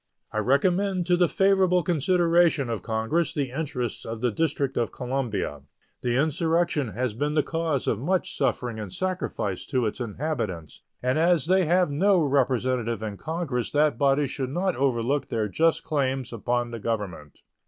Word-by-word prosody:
I 110 - -1
recommend 180 - +2
to 180 0 +3
the 175 0 +3
favorable 190 -2 +3
consideration 170 -3 +2
of 115 - -3
Congress 115 +8 -1
the 140 -4 -1
interests 125 -5 -3
of 115 0 -5
the 125 0 +1
District 140 +1 -1
of 120 - 0
Columbia. 120 - -3 0.4
The 120 -1 0
insurrection 160 - +1
has 125 +1 -1
been 145 +6 -2
the 150 - +3
cause 160 -4 -1
of 105 - +1
much 180 +8 -1
suffering 120 -3 -1
and 105 -4 -6
sacrifice 180 - -3
to 130 -4 0
its 105 - -3
inhabitants, 105 - -4 0.2
and 130 +4 +1
as 170 -3 +3
they 185 +1 +3
have 175 0 +2
no 190 +6 +3
representative 130 -5 +1
in 105 -2 -4
Congress 155 - -3
that 150 -4 +2
body 140 +1 +3
should 130 -1 -3
not 180 +6 0
overlook 135 +1 0
their 110 -2 -1
just 160 +10 +1
claims 135 -4 -1
upon 120 +1 -1
the 115 - -5
Government. 100 -10 -4
135 Hz, 165 wpm, -26 LUFS, 120-165 Hz, 0.4 s, to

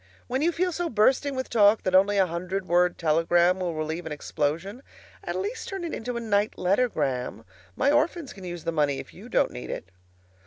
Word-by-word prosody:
When 260 +2 -2
you 335 +3 +3
feel 360 +2 0
so 350 0 -2
bursting 260 +5 +2
with 260 0 -3
talk 210 -1 +4
that 185 - -1
only 195 +2 +5
a 190 - +5
hundred 180 +3 -3
word 175 +1 +3
telegram 170 +3 +3
will 175 -3 -2
relieve 160 +2 -3
an - - -6
explosion, 165 - -2 0.4
at - - -4
least 425 +5 -3
turn 390 -2 -5
it 335 - -4
into 240 +1 -4
a - - -1
night 210 -2 0
lettergram. 135 - 0 0.3
My 280 - +2
orphans 305 0 0
can 195 - -12
use 175 -2 -6
the 165 - -1
money 145 -3 +1
if - - -9
you - - -12
don't - - +2
need 60 +1 -8
it. 95 - -6
190 Hz, 205 wpm, -26 LUFS, 165-255 Hz, 0.4 s, only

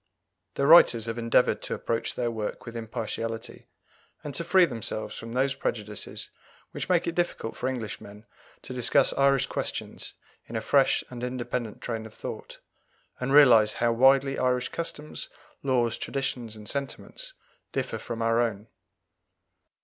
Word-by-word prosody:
The 140 - +1
writers 140 -8 +7
have 115 0 -3
endeavoured 115 0 +3
to - - -3
approach 115 - -2
their 120 -1 -1
work 110 -2 -4
with 115 - -8
impartiality, 115 0 -5 0.6
and 145 - -5
to 170 - -2
free 180 +2 +5
themselves 110 -5 -4
from 115 +1 -7
those 135 +2 +2
prejudices 105 -6 -4 0.4
which - - -5
make 180 -2 +3
it 170 - -1
difficult 175 -9 -2
for 130 - -2
Englishmen 110 -3 -6 0.4
to - - -7
discuss 125 -2 +3
Irish 140 -1 +3
questions - - -5 0.3
in - - -8
a - - +1
fresh - - +3
and 120 -1 -7
independent 125 -2 -3
train 110 -2 -4
of 110 - -17
thought, - - -7 0.6
and 125 +1 -2
realize 120 -7 +7
how 120 0 +1
widely 135 +3 +4
Irish 125 -1 +1
customs, 155 -2 -5 0.3
laws, 120 -4 +1
traditions, 125 -5 -3
and 105 -1 -11
sentiments 145 - -5 0.4
differ - - -2
from 115 0 -4
our 115 +1 +3
own. 110 -2 -2
120 Hz, 150 wpm, -27 LUFS, 115-135 Hz, 0.6 s, writers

